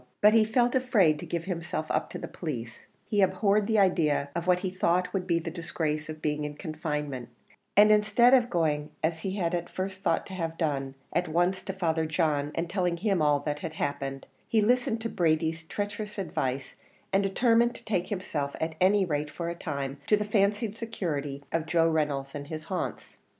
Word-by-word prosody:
But 210 Hz, +1 st, +6 dB
he 225 Hz, -1 st, +6 dB
felt 240 Hz, +2 st, +2 dB
afraid 210 Hz, -12 st, +3 dB
to -, -, -7 dB
give 170 Hz, -1 st, -2 dB
himself 170 Hz, -2 st, -3 dB
up -, -, 0 dB
to -, -, -6 dB
the -, -, -6 dB
police; 120 Hz, -9 st, -6 dB, 0.2 s
he 205 Hz, -2 st, +2 dB
abhorred 200 Hz, +1 st, +3 dB
the 220 Hz, -1 st, +2 dB
idea 165 Hz, -7 st, +3 dB
of 170 Hz, +1 st, -3 dB
what 180 Hz, 0 st, +4 dB
he 185 Hz, -1 st, -2 dB
thought 180 Hz, 0 st, +1 dB
would 185 Hz, -2 st, -2 dB
be 170 Hz, -2 st, +3 dB
the 165 Hz, 0 st, -3 dB
disgrace 155 Hz, -2 st, -3 dB
of 155 Hz, 0 st, -7 dB
being 150 Hz, -1 st, 0 dB
in 150 Hz, 0 st, -4 dB
confinement; 150 Hz, -5 st, -4 dB, 0.5 s
and 210 Hz, +1 st, +8 dB
instead 215 Hz, +4 st, +5 dB
of 245 Hz, -2 st, +5 dB
going, 150 Hz, -5 st, 0 dB
as 160 Hz, +1 st, 0 dB
he 195 Hz, +4 st, -3 dB
at 175 Hz, -1 st, -1 dB
first 190 Hz, 0 st, -4 dB
thought -, -, +1 dB
to 190 Hz, -, -9 dB
have 165 Hz, -3 st, -3 dB
done, 135 Hz, -4 st, -1 dB, 0.2 s
at 175 Hz, 0 st, +1 dB
once 175 Hz, +4 st, +1 dB
to 190 Hz, -, -3 dB
Father 165 Hz, -4 st, 0 dB
John, 150 Hz, -3 st, 0 dB
and 165 Hz, +1 st, -1 dB
telling 180 Hz, -1 st, 0 dB
him 195 Hz, -1 st, +1 dB
all 145 Hz, -1 st, +3 dB
that 150 Hz, 0 st, -3 dB
had 160 Hz, 0 st, -6 dB
happened, 135 Hz, -3 st, -3 dB, 0.2 s
he 225 Hz, -, +2 dB
listened 230 Hz, +1 st, +2 dB
to 230 Hz, -, -2 dB
Brady's 160 Hz, -2 st, +1 dB
traitorous 205 Hz, +3 st, -4 dB
advice, 140 Hz, -8 st, -2 dB, 0.4 s
and 195 Hz, -, +4 dB
determined 235 Hz, +4 st, +3 dB
to -, -, -13 dB
take 185 Hz, -4 st, 0 dB
himself, 155 Hz, -8 st, -3 dB
at 160 Hz, 0 st, -1 dB
any 195 Hz, +1 st, +5 dB
rate 150 Hz, -3 st, -1 dB
for 170 Hz, +3 st, -4 dB
a -, -, -2 dB
time, 140 Hz, -4 st, -4 dB
to 210 Hz, -, +5 dB
the 210 Hz, -, -2 dB
fancied 210 Hz, +1 st, +1 dB
security 150 Hz, -11 st, -3 dB
of 165 Hz, -1 st, -1 dB
Joe 165 Hz, 0 st, +3 dB
Reynolds 145 Hz, -4 st, 0 dB
and 145 Hz, -1 st, -6 dB
his 155 Hz, 0 st, -6 dB
haunts. 185 Hz, +2 st, -4 dB
170 Hz, 200 wpm, -28 LUFS, 150-200 Hz, 0.5 s, and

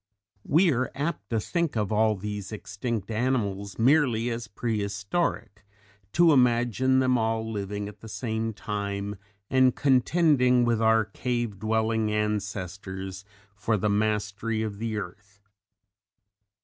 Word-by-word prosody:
We 165 Hz, +4 st, +4 dB
are 125 Hz, +1 st, 0 dB
apt 145 Hz, -8 st, -3 dB
to 115 Hz, -, +1 dB
think 170 Hz, -, -1 dB
of 105 Hz, -2 st, -1 dB
all 110 Hz, 0 st, +3 dB
these 105 Hz, 0 st, -5 dB
extinct 110 Hz, +1 st, -4 dB
animals 105 Hz, -5 st, -1 dB
merely 120 Hz, -2 st, +3 dB
as 115 Hz, -1 st, -4 dB
prehistoric 105 Hz, -, -2 dB, 0.5 s
to 170 Hz, -1 st, +5 dB
imagine 125 Hz, 0 st, +3 dB
them 130 Hz, -1 st, +3 dB
all 110 Hz, 0 st, 0 dB
living 100 Hz, -1 st, -4 dB
at 105 Hz, -, -11 dB
the 115 Hz, -, -11 dB
same 110 Hz, +1 st, -2 dB
time 100 Hz, -1 st, -4 dB, 0.3 s
and 130 Hz, -1 st, +4 dB
contending 130 Hz, -2 st, +3 dB
with 115 Hz, -1 st, +1 dB
our 110 Hz, 0 st, +4 dB
cave 120 Hz, -4 st, -3 dB
dwelling 110 Hz, 0 st, +1 dB
ancestors 95 Hz, -2 st, -3 dB, 0.3 s
for 105 Hz, +1 st, 0 dB
the 105 Hz, +2 st, 0 dB
mastery 105 Hz, +1 st, 0 dB
of 105 Hz, -2 st, -5 dB
the 110 Hz, -1 st, -2 dB
earth. 100 Hz, +1 st, -8 dB
110 Hz, 125 wpm, -27 LUFS, 100-120 Hz, 0.5 s, to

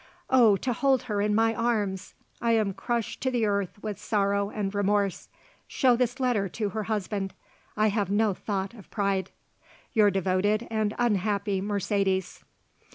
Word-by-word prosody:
Oh, 235 Hz, -6 st, +6 dB
to 245 Hz, +5 st, -1 dB
hold 265 Hz, +1 st, +2 dB
her 210 Hz, -4 st, -1 dB
in 210 Hz, 0 st, +1 dB
my 225 Hz, +1 st, +3 dB
arms! 210 Hz, -5 st, -1 dB, 0.3 s
I 235 Hz, -1 st, +2 dB
am 215 Hz, -3 st, +1 dB
crushed 235 Hz, +3 st, -3 dB
to 260 Hz, -, +1 dB
the 240 Hz, -3 st, +1 dB
earth 200 Hz, -3 st, -1 dB
with 210 Hz, -2 st, -4 dB
sorrow 200 Hz, -1 st, 0 dB
and 205 Hz, -2 st, -3 dB
remorse. 200 Hz, -1 st, 0 dB, 0.4 s
Show 255 Hz, -3 st, +3 dB
this 245 Hz, +1 st, -1 dB
letter 235 Hz, -7 st, +1 dB
to 210 Hz, +2 st, -2 dB
her 215 Hz, +1 st, -4 dB
husband. 200 Hz, -2 st, -2 dB, 0.4 s
I 215 Hz, 0 st, +4 dB
have 205 Hz, -2 st, -1 dB
no 205 Hz, 0 st, +2 dB
thought 195 Hz, +1 st, -3 dB
of 215 Hz, -5 st, -14 dB
pride. 195 Hz, -3 st, -1 dB, 0.6 s
"Your 215 Hz, -3 st, +5 dB
devoted 195 Hz, +3 st, +1 dB
and 215 Hz, -1 st, 0 dB
unhappy 205 Hz, -3 st, 0 dB
Mercedes." 195 Hz, -2 st, -1 dB
205 Hz, 160 wpm, -27 LUFS, 195-225 Hz, 0.6 s, Oh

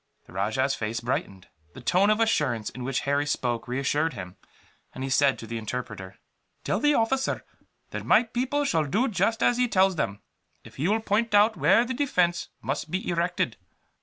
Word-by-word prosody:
The -, -, -16 dB
rajah's 110 Hz, +8 st, 0 dB
face 115 Hz, -2 st, -3 dB
brightened. 100 Hz, -6 st, -3 dB, 0.3 s
The -, -, -10 dB
tone 195 Hz, +3 st, +3 dB
of 215 Hz, +1 st, +3 dB
assurance 145 Hz, -, +1 dB
in 125 Hz, -, -8 dB
which 135 Hz, +1 st, -1 dB
Harry 140 Hz, +1 st, 0 dB
spoke 120 Hz, -5 st, -1 dB
reassured 140 Hz, +5 st, 0 dB
him, 90 Hz, -4 st, -8 dB, 0.6 s
and 130 Hz, -, -5 dB
he 135 Hz, -, -3 dB
said 140 Hz, 0 st, +3 dB
to -, -, -8 dB
the 115 Hz, +1 st, -4 dB
interpreter: 110 Hz, -4 st, -6 dB, 0.5 s
"Tell -, -, 0 dB
the 295 Hz, 0 st, +3 dB
officer 260 Hz, +4 st, 0 dB, 0.5 s
that -, -, -5 dB
my 225 Hz, -, +5 dB
people 255 Hz, +5 st, -1 dB
shall 160 Hz, -, +1 dB
do 215 Hz, -, +1 dB
just 225 Hz, +2 st, 0 dB
as 245 Hz, -, +3 dB
he 250 Hz, 0 st, +2 dB
tells 190 Hz, -4 st, +3 dB
them, 100 Hz, -7 st, -2 dB, 0.4 s
if -, -, -15 dB
he 150 Hz, -, 0 dB
will 220 Hz, +3 st, +1 dB
point 220 Hz, +1 st, +1 dB
out 215 Hz, +2 st, +5 dB
where 235 Hz, -, +4 dB
the 260 Hz, -, -3 dB
defence 180 Hz, -11 st, 0 dB
must 135 Hz, +6 st, -3 dB
be 185 Hz, +4 st, -3 dB
erected." 175 Hz, -, -1 dB
160 Hz, 190 wpm, -26 LUFS, -, 0.6 s, my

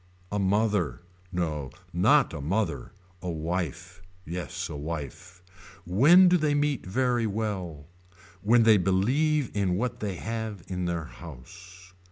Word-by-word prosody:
A 105 Hz, -, -1 dB
mother. 95 Hz, -, +1 dB, 0.3 s
No 80 Hz, -6 st, -2 dB, 0.2 s
not -, -, +4 dB
a -, -, -5 dB
mother 80 Hz, -, -2 dB, 0.3 s
A 90 Hz, -, -4 dB
wife. 85 Hz, +2 st, -4 dB, 0.2 s
Yes 85 Hz, +1 st, -4 dB
a -, -, -7 dB
wife. 85 Hz, +4 st, -7 dB, 0.4 s
When 150 Hz, -, +6 dB
do 180 Hz, 0 st, +5 dB
they 150 Hz, -3 st, +1 dB
meet 145 Hz, -7 st, 0 dB
very 120 Hz, +2 st, +1 dB
well. 95 Hz, -8 st, -4 dB, 0.6 s
When 115 Hz, +4 st, +4 dB
they 110 Hz, -1 st, +6 dB
believe 125 Hz, -, +1 dB
in 95 Hz, -3 st, +1 dB
what 120 Hz, +2 st, -2 dB
they 100 Hz, -3 st, -3 dB
have 110 Hz, -2 st, -5 dB
in 90 Hz, -1 st, -3 dB
their 85 Hz, -2 st, -2 dB
house. 90 Hz, +5 st, -13 dB
95 Hz, 135 wpm, -27 LUFS, 85-110 Hz, 0.6 s, When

